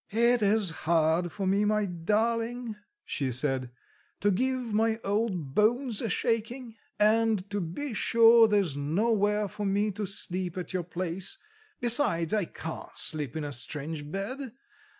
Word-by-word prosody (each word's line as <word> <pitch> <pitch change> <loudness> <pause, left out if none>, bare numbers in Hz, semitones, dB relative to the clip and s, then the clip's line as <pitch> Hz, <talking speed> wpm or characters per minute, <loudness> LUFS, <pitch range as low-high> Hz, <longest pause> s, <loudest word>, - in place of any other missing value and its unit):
"It 235 +2 +3
is 205 -3 +3
hard 160 +1 +1
for 195 - -4
me, 195 +2 +2
my 210 0 +1
darling," 225 +6 -1 0.3
she 135 -3 -2
said, 130 0 -1 0.5
"to 205 - +3
give 255 +2 -1
my 220 +1 +1
old 195 -9 -1
bones 235 - +2
a 230 - -2
shaking; 230 +3 -2 0.2
and 215 -2 +3
to 205 -1 -1
be 225 - -4
sure 230 +1 +6
there's 200 -9 +1
nowhere 205 +7 +1
for 210 - -6
me 205 +2 +1
to 205 0 -4
sleep 185 -1 -3
at 180 +1 -5
your 185 -1 -1
place: 180 - -3 0.4
besides, 235 - +2
I 210 -4 +1
can't 160 0 -8
sleep 150 -5 -1
in 155 - -3
a 145 - -4
strange 145 +4 -3
bed. 230 - -5
205 Hz, 150 wpm, -28 LUFS, 170-225 Hz, 0.5 s, sure